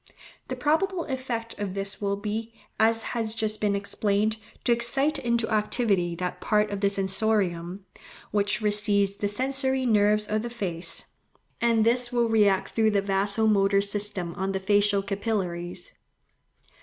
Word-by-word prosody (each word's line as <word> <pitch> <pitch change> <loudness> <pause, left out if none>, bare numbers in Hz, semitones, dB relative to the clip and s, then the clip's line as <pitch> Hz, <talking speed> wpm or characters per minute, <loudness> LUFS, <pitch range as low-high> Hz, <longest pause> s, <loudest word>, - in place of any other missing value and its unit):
The - - -4
probable 340 +4 0
effect 250 -5 -5
of 200 -2 -4
this 195 +1 -3
will 200 -1 0
be, 220 +3 -5 0.2
as 225 +1 +3
has 225 -2 -2
just 215 -1 -2
been 205 -1 +1
explained, 205 +2 0 0.3
to - - +1
excite 270 +6 +3
into 235 -1 0
activity 210 -5 +1
that 180 +1 -4
part 210 0 +1
of 200 - -3
the 200 - +3
sensorium, 195 -2 -1 0.5
which 205 +2 +1
receives 205 -1 +2
the 205 - -1
sensory 265 +4 0
nerves 210 -2 +3
of 215 +1 -1
the 240 - -5
face; 185 -8 0 0.6
and 230 -2 +3
this 240 +1 +2
will 240 -1 +2
react 205 -4 +2
through 220 -1 +2
the 205 -2 +1
vaso 200 +2 0
motor 200 -2 +3
system 200 -3 -2
on 195 +1 -3
the 190 - -1
facial 205 0 +2
capillaries. 185 -4 -3
210 Hz, 150 wpm, -26 LUFS, 200-230 Hz, 0.6 s, as